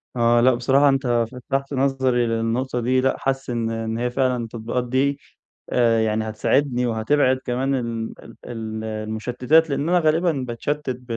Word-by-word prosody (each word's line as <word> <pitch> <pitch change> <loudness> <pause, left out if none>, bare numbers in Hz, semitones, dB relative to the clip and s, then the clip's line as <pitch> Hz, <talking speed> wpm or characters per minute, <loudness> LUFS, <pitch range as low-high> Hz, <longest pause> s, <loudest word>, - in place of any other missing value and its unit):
آه، 120 0 +3
لأ 130 +1 +5
بصراحة 135 +4 +3
أنت 125 -4 +1
فتّحت 135 +2 -3
نظري 130 -2 +1
للنقطة 115 +3 -1
دي، 130 +2 +1
لأ 130 0 +1
حاسس 135 -1 -2
إن 115 -2 -1
إن 115 0 -3
هي 125 +1 -1
فعلًا 125 -2 0
التطبيقات 115 +2 -3
دي، 140 +2 +1 0.5
آآ، 115 -2 +3
يعني 110 0 0
هتساعدني 125 +3 +1
وهتبعد 130 +4 +2
كمان 130 +2 0
ال 115 -3 -3 0.3
ال 110 -2 -5
المشتّتات، 110 +8 0
لأن 140 +3 -1
أنا 180 0 +4
غالبًا 165 +2 +2 0.2
باتشتِّت 145 +5 -3
بال 125 0 -5
125 Hz, 155 wpm, -22 LUFS, 115-135 Hz, 0.5 s, لأ